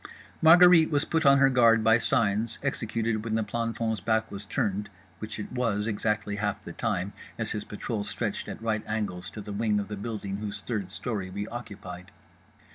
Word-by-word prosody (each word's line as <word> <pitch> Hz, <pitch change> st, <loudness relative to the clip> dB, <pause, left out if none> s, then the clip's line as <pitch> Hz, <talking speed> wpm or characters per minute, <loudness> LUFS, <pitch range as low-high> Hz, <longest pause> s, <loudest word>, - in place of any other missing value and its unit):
Margherite 170 Hz, 0 st, +8 dB
was 145 Hz, -1 st, +1 dB
put 160 Hz, -2 st, +1 dB
on 140 Hz, 0 st, +7 dB
her 135 Hz, 0 st, +5 dB
guard 115 Hz, -3 st, +5 dB
by 115 Hz, +1 st, +5 dB
signs, 110 Hz, 0 st, +1 dB
executed 115 Hz, -4 st, -1 dB
when 110 Hz, -1 st, -1 dB
the 110 Hz, -, +1 dB
planton's 115 Hz, 0 st, -2 dB
back 110 Hz, +3 st, 0 dB
was 100 Hz, +1 st, -6 dB
turned 105 Hz, -2 st, -1 dB, 0.3 s
(which 110 Hz, 0 st, -6 dB
it 105 Hz, -, -6 dB
was 115 Hz, -5 st, 0 dB
exactly 105 Hz, -1 st, -1 dB
half 105 Hz, -1 st, -2 dB
the -, -, -7 dB
time, 95 Hz, +3 st, -2 dB, 0.2 s
as 110 Hz, -1 st, -2 dB
his 105 Hz, -1 st, -3 dB
patrol 105 Hz, 0 st, -4 dB
stretched 100 Hz, -3 st, -3 dB
at -, -, -7 dB
right 110 Hz, -1 st, 0 dB
angles 105 Hz, -5 st, -3 dB
to 105 Hz, -, -8 dB
the 105 Hz, 0 st, -7 dB
wing 105 Hz, 0 st, +1 dB
of 100 Hz, -, -5 dB
the 105 Hz, -, -4 dB
building 100 Hz, -2 st, -4 dB
whose 105 Hz, 0 st, -4 dB
third 105 Hz, -6 st, -3 dB
story 105 Hz, -4 st, -3 dB
we 100 Hz, +3 st, -4 dB
occupied). 95 Hz, -6 st, -8 dB
110 Hz, 190 wpm, -28 LUFS, 100-115 Hz, 0.3 s, Margherite